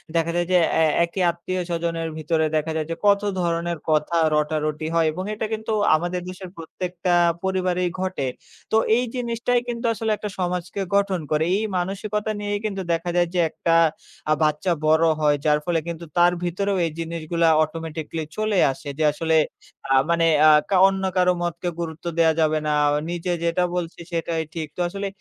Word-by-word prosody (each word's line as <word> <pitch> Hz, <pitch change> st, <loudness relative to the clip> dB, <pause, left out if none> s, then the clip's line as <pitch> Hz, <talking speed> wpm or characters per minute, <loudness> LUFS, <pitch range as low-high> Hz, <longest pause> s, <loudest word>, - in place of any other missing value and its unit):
দেখা 165 Hz, 0 st, +1 dB
যায় 175 Hz, 0 st, 0 dB
যে 180 Hz, -, +6 dB, 0.2 s
অ্যা 160 Hz, -, +4 dB, 0.2 s
একই 170 Hz, +3 st, -4 dB
আত্মীয়স্বজনের 170 Hz, -1 st, -3 dB
ভিতরে 160 Hz, 0 st, 0 dB
দেখা 155 Hz, +1 st, 0 dB
যায় 155 Hz, -1 st, -2 dB
যে -, -, -1 dB
কত 200 Hz, -1 st, +5 dB, 0.2 s
ধরণের 170 Hz, -1 st, -1 dB
কথা 155 Hz, +2 st, +1 dB, 0.2 s
রটারটি 155 Hz, 0 st, -1 dB
হয় 165 Hz, -1 st, +3 dB
এবং 180 Hz, +4 st, -5 dB
এটা 215 Hz, +1 st, -3 dB
কিন্তু 220 Hz, 0 st, -3 dB, 0.2 s
আমাদের 175 Hz, +3 st, -2 dB
দেশের 185 Hz, 0 st, -8 dB
প্রত্যেকটা 175 Hz, +2 st, -3 dB, 0.3 s
পরিবারেই 180 Hz, -1 st, 0 dB
ঘটে। 185 Hz, -8 st, -2 dB, 0.4 s
তো 220 Hz, -, +4 dB, 0.2 s
এই 250 Hz, -, +1 dB
জিনিসটাই 240 Hz, 0 st, 0 dB
কিন্তু 240 Hz, 0 st, -4 dB
আসলে 220 Hz, 0 st, -2 dB
একটা 210 Hz, +1 st, -5 dB
সমাজকে 180 Hz, +1 st, -2 dB
গঠন 200 Hz, -2 st, +2 dB
করে। 155 Hz, +1 st, +2 dB
এই 215 Hz, -, -1 dB
মানসিকতা 205 Hz, +4 st, -2 dB
নিয়েই 205 Hz, 0 st, -2 dB
কিন্তু 195 Hz, -2 st, -2 dB
দেখা 165 Hz, +1 st, -2 dB
যায় 175 Hz, 0 st, +3 dB
যে 180 Hz, -, 0 dB
একটা 165 Hz, +1 st, 0 dB, 0.6 s
আ -, -, +7 dB
বাচ্চা 150 Hz, +4 st, +1 dB, 0.2 s
বড় 160 Hz, +1 st, +4 dB
হয়, 150 Hz, -1 st, +3 dB
যার 150 Hz, -1 st, +4 dB
ফলে 170 Hz, -2 st, +1 dB
কিন্তু 170 Hz, 0 st, -5 dB
তার 175 Hz, 0 st, +5 dB
ভিতরেও 195 Hz, +3 st, -1 dB
এই 165 Hz, -, -2 dB
জিনিসগুলা 165 Hz, 0 st, -1 dB, 0.2 s
automatically 160 Hz, 0 st, -5 dB
চলে 215 Hz, -1 st, 0 dB
আসে। 135 Hz, +2 st, -8 dB
যে 155 Hz, -, 0 dB
আসলে 160 Hz, +1 st, 0 dB, 0.6 s
আ -, -, +5 dB
মানে 170 Hz, -1 st, +3 dB, 0.2 s
আ -, -, +8 dB, 0.2 s
কা 195 Hz, -, +3 dB
অন্য 195 Hz, 0 st, -1 dB
কারো 180 Hz, 0 st, +4 dB
মতকে 175 Hz, +1 st, -2 dB
গুরুত্ব 160 Hz, -1 st, -6 dB
দেয়া 165 Hz, -1 st, +4 dB
যাবে 155 Hz, -1 st, +2 dB
না। 150 Hz, -, +1 dB, 0.4 s
নিজে 175 Hz, +1 st, -2 dB
যেটা 170 Hz, +1 st, +1 dB
বলছি 175 Hz, -1 st, -4 dB
সেটাই 165 Hz, -1 st, -1 dB
ঠিক। 160 Hz, -2 st, -4 dB
তো -, -, -1 dB
আসলে 200 Hz, +2 st, -4 dB
170 Hz, 175 wpm, -23 LUFS, 160-190 Hz, 0.6 s, আ